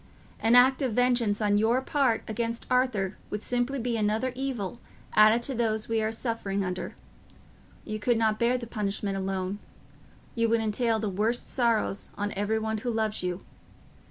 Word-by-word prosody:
An 225 +2 +4
act 260 +3 +6
of 255 -5 0
vengeance 240 -3 +2
on 205 0 +3
your 230 +4 +3
part 265 -3 +1
against 230 +1 -2
Arthur 240 -7 +1
would 210 0 -4
simply 245 +3 0
be 240 -2 -1
another 220 +4 0
evil 245 -6 -3 0.3
added 215 +2 +6
to 270 - 0
those 220 -3 0
we 225 -1 0
are 220 0 0
suffering 220 -4 -2
under: 180 0 -4 0.9
you 215 -1 -4
could 235 +2 +2
not 220 -1 +1
bear 240 +2 +2
the 240 - -6
punishment 205 -3 -2
alone; 190 0 -2 0.7
you 230 -1 +1
would 230 0 +3
entail 225 +1 +1
the 215 0 -2
worst 215 +5 0
sorrows 230 -5 0
on 205 0 -2
every 205 +3 0
one 220 0 -2
who 245 - -3
loves 220 -2 0
you. 180 0 -3
225 Hz, 170 wpm, -28 LUFS, 210-240 Hz, 0.9 s, act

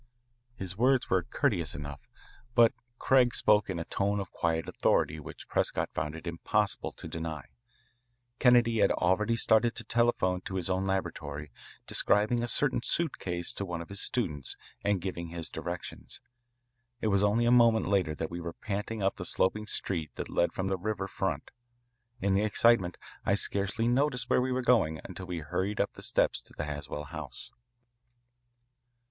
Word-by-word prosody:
His 95 -4 -5
words 130 +4 +2
were - - +4
courteous 80 -6 0
enough, 70 -2 -8 0.5
but 115 -2 +6 0.2
Craig 125 -2 +4
spoke 105 -2 +3
in 95 - -2
a 85 - -3
tone 100 +1 0
of 95 -2 -5
quiet 80 -1 -1
authority 80 - +1
which 75 - -10
Prescott - - 0
found 75 +1 -2
it 80 - -9
impossible 100 +4 0
to - - -9
deny. 80 -3 -5 0.9
Kennedy 120 -2 +5
had 100 - +5
already 105 +6 +2
started 115 +1 +3
to - - -4
telephone 115 -6 +1
to 95 - -6
his 95 0 0
own 95 +1 0
laboratory, 75 -7 -3 0.3
describing 110 +4 +2
a 120 - -1
certain 130 +2 +3
suitcase 90 - -1
to - - -4
one 90 -3 -4
of 85 - -8
his 100 0 -5
students 75 - -2 0.3
and 100 -3 +1
giving 85 -2 -4
his 85 -1 -5
directions. - - -6 0.8
It 110 - 0
was 100 -1 +3
only 105 +3 +3
a 120 - +4
moment 115 -2 +5
later 90 -6 +1
that 80 +1 -4
we 85 0 -5
were 85 0 -5
panting 105 +1 -4
up 95 - +1
the - - -5
sloping 105 +3 0
street 80 -8 -1
that - - -5
led 85 - +2
from 95 - -3
the 95 0 0
river 100 0 -2
front. 95 -1 -3 0.7
In 100 -4 +1
the 100 - +3
excitement 105 -3 +3 0.3
I 100 - +2
scarcely 100 +3 +1
noticed 125 +1 +1
where - - +4
we 130 +1 -1
were 130 0 0
going 95 -11 +3
until 95 0 -8
we 90 -2 -4
hurried 95 +7 -2
up 100 - 0
the - - -12
steps - - +1
to - - -16
the - - -2
Haswell 75 0 -5
house. 70 - -8
95 Hz, 175 wpm, -30 LUFS, 85-115 Hz, 0.9 s, but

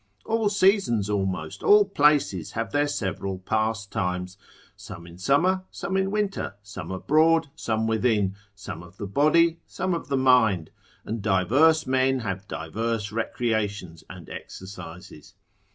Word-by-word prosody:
All 225 -2 +1
seasons 190 - +2
almost, 95 -6 -2
all 205 0 +6
places, 145 - +2
have 115 +1 -3
their 145 0 +2
several 95 -6 -3
pastimes; 95 -3 -2 0.4
some 85 - -10
in 85 +1 -13
summer, 180 - +2
some 190 +1 -4
in 190 0 +1
winter; 200 - -2
some 100 0 -8
abroad, 155 - +2
some 110 -1 -1
within: 110 -3 +1 0.2
some 95 -4 -8
of 85 +2 -15
the 100 - -5
body, 160 - +3
some 185 0 -2
of 170 - -4
the 140 -1 0
mind: 115 -10 +3 0.3
and 110 0 -4
diverse 130 - +3
men 130 0 +1
have 100 -2 -4
diverse 105 +6 -3
recreations 105 -6 -2
and 90 -3 -10
exercises. 90 -3 -10
110 Hz, 135 wpm, -25 LUFS, 95-150 Hz, 0.4 s, all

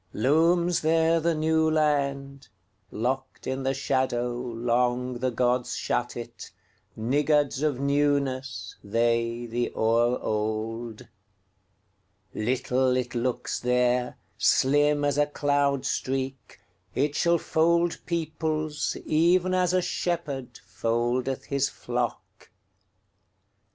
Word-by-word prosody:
Looms 165 +7 +2
there 165 +1 +3
the 165 0 +1
New 160 +1 +2
Land:Locked 140 - -3
in 130 +1 -2
the 135 - 0
shadowLong 125 -1 -1
the 130 +1 0
gods 125 +1 0
shut 120 0 -2
it, 120 0 -8 0.5
Niggards 145 +4 +1
of 150 -3 +1
newnessThey, 120 -4 -1
the 120 +1 -2
o'er 115 +2 +2
old. 110 +1 -3 1.3
Little 125 +2 +1
it 125 -1 -3
looks 125 0 -2
there, 125 0 +1 0.2
Slim 145 +7 +3
as 145 0 +1
a 145 - +3
cloud 145 -2 0
streak; 130 0 -3 0.4
It 145 +2 +1
shall 170 0 +3
fold 170 +2 +1
peoplesEven 160 +2 0
as 180 -1 +2
a 185 0 +2
shepherdFoldeth 125 - -2
his 140 -1 0
flock. 120 -1 -5
130 Hz, 90 wpm, -26 LUFS, 120-150 Hz, 1.3 s, there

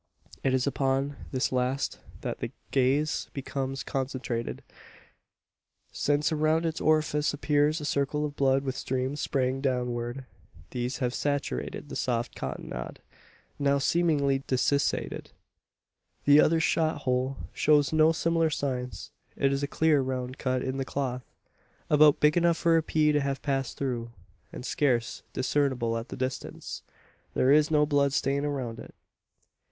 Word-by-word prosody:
It 130 -1 +2
is 130 - +1
upon 135 0 0 0.2
this 130 -1 0
last 130 +2 -1 0.2
that - - -4
the - - -4 0.2
gaze 140 +3 +1
becomes 135 0 -3
concentrated: 130 -4 -3 1.3
since 145 +2 +1
around 155 +1 +2
its 160 -1 -2
orifice 155 -1 +2
appears 150 +2 +2
a 150 - -5
circle 145 +1 0
of 145 -1 -5
blood 135 -1 +2
with 135 -1 -3
streams 130 +3 -2
straying 130 -1 0
downward. 125 -1 -2 0.5
These 125 +1 -2
have 120 - -1
saturated 140 - -2
the - - -6
soft 120 -1 -1
cottonade - - -6 0.6
now 140 0 +3
seemingly 140 -3 +2
desiccated. 135 +2 0 1.0
The 145 +1 +7
other 165 +1 +3
shot 160 0 +1
hole 130 +1 0 0.2
shows 150 0 +3
no 155 0 +5
similar 165 0 +1
signs. 130 -4 -3 0.2
It 135 0 +2
is 135 - -1
a 145 - -1
clear 155 0 +3
round 130 0 -3
cut 130 -1 0
in 130 0 -2
the 135 - -1
cloth 130 -2 -4 0.6
about 150 -1 +6
big 150 0 +4
enough 170 -1 +3
for 165 -1 +3
a 165 - +4
pea 155 -1 +2
to 150 -1 +2
have 140 -1 -2
passed 135 -3 -1
through, 120 -4 -2 0.4
and 125 - -8
scarce 125 -6 0
discernible 130 -3 0
at 115 +2 -4
the - - -6
distance. 130 0 -4 0.5
There 130 - +4
is 150 +1 +5
no 150 -1 +4
blood 140 -2 +2
stain 140 +1 +1
around 130 -6 -3
it. - - -11
140 Hz, 145 wpm, -28 LUFS, 130-150 Hz, 1.3 s, The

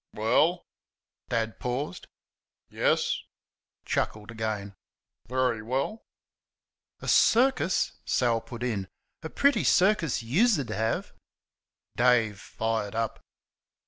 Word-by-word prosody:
"Well" 150 +11 +2 0.6
(Dad 115 -2 -1
paused), 125 -3 -4 0.6
"yes" - - +1 0.7
(chuckled 105 +1 -2
again) 110 -3 -4 0.5
"very 125 -2 0
well." 135 - -2 1.0
"A - - -7
CIRCUS!" 240 -6 +3
Sal 115 -2 +1
put 115 +1 -8
in 105 -6 -2 0.3
"a 160 - -6
PRETTY 280 - +2
circus 185 - +3
YOUS'D 150 - +2
have!" 110 +1 -2 0.8
Dave 115 -4 +3
fired 110 -1 -3
up. 115 -1 -2
120 Hz, 90 wpm, -27 LUFS, 110-150 Hz, 1.0 s, CIRCUS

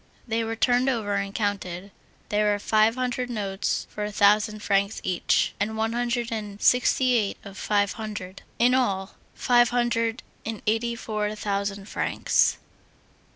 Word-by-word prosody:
They 230 0 0
were 225 0 -3
turned 245 +3 +2
over 220 -5 -1
and 195 0 -1
counted. 200 -2 -3 0.4
There 210 0 +2
were 205 - +1
five 215 +2 +3
hundred 250 -1 -2
notes 200 -4 -2
for 210 - -4
a 210 - -3
thousand 210 +1 +3
francs 200 +1 +1
each, 180 -2 +1
and 220 +2 -1
one 225 +1 0
hundred 240 0 -1
and 210 -2 -5
sixty 250 +1 +3
eight 215 -4 +1
of 200 -1 -10
five 205 0 +1
hundred. 205 -4 -7 0.2
In 245 +2 +4
all, 195 -7 0 0.2
five 240 -1 +4
hundred 235 -1 0 0.2
and 220 -2 -5
eighty 225 +2 0
four 215 -2 -3
thousand 200 -1 -3
francs. - - +1
215 Hz, 155 wpm, -25 LUFS, 200-235 Hz, 0.4 s, In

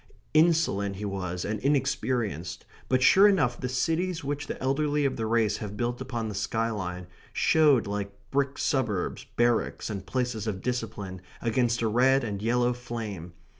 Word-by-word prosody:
Insolent 155 - +3
he 105 +2 -5
was 90 -3 -3
and 105 0 -2
inexperienced, 120 - -1 0.2
but 130 0 +3
sure 195 +8 +7
enough 140 -12 +2
the 125 - -2
cities 165 +6 0
which 145 +1 -3
the - - -5
elderly 145 +2 +1
of 135 - 0
the 110 -1 -2
race 110 -2 +2
have 105 -1 -6
built 120 +2 -2
upon 120 -4 -3
the 105 - -4
skyline 100 -3 -2 0.3
showed 150 -6 +4
like 100 0 -3 0.2
brick 140 0 0
suburbs, 120 - -1
barracks, 120 -2 +1
and 95 -3 -6
places 120 -1 -2
of 95 -3 -3
discipline 110 -7 -3 0.2
against 120 0 +1
a - - +2
red 130 +4 +4
and 100 -3 -3
yellow 120 +2 +2
flame. 110 -8 -6
120 Hz, 160 wpm, -27 LUFS, 100-135 Hz, 0.3 s, sure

